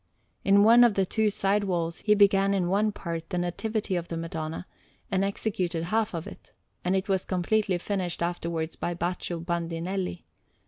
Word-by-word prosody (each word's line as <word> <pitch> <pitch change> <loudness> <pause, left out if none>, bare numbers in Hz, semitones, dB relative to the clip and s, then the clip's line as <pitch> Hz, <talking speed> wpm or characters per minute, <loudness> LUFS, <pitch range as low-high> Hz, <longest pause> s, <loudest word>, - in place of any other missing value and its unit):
In 200 +1 +5
one 235 +3 +8
of 235 -4 +4
the 195 - +2
two 215 +3 +1
side 200 0 +1
walls, 170 -3 -1
he 210 -1 +3
began 200 -1 +4
in 180 -3 0
one 210 +3 +2
part 165 -4 -5
the 180 - -2
Nativity 195 +3 -2
of 175 -1 -2
the 165 - -4
Madonna, 165 0 -4 0.5
and 190 0 +2
executed 185 -4 -2
half 215 +2 0
of 165 - -4
it; - - -12 0.3
and 180 +2 +1
it 190 - -1
was 190 -2 +1
completely 190 +1 0
finished 180 -2 -2
afterwards 170 -2 -2
by 175 - -3
Baccio 175 0 -3
Bandinelli. 170 +2 -3
185 Hz, 175 wpm, -27 LUFS, 170-200 Hz, 0.5 s, one